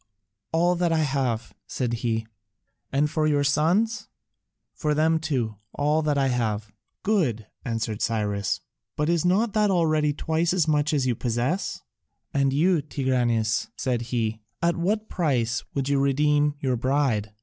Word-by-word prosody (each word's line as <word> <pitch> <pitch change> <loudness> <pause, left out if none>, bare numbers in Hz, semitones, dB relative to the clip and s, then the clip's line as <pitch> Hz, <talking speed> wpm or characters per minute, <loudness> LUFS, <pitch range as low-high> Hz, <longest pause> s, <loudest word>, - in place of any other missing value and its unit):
"All 175 +2 +3
that 175 -1 +1
I 160 -1 +2
have," 130 -5 -1
said 125 -3 -2
he. 110 -2 -1 0.7
"And 140 +2 +2
for 155 0 0
your 145 -1 +2
sons?" 200 +10 +1 0.7
"For 150 -1 -1
them 160 +1 +3
too, 125 -9 -2 0.2
all 150 +2 +1
that 150 -2 0
I 135 -1 +2
have." 110 -4 -1 0.3
"Good," 145 - +1 0.2
answered 115 -2 -3
Cyrus, 105 -3 -1 0.3
"but 150 +1 0
is 170 -1 +2
not 200 +4 +2
that 210 -1 +3
already 155 -5 +2
twice 160 +3 0
as 175 -4 +2
much 150 -1 +2
as 140 -4 +1
you 125 - +2
possess? 125 - -2 0.5
And 135 -1 +2
you, 165 +4 +3
Tigranes," 125 - 0
said 125 -3 -1
he, 110 -2 -1 0.2
"at 170 0 +1
what 210 +5 -1
price 125 -9 0
would 135 -1 -1
you 140 -1 +2
redeem 145 +1 +2
your 130 -3 0
bride?" 120 -5 0
145 Hz, 150 wpm, -25 LUFS, 120-160 Hz, 0.7 s, All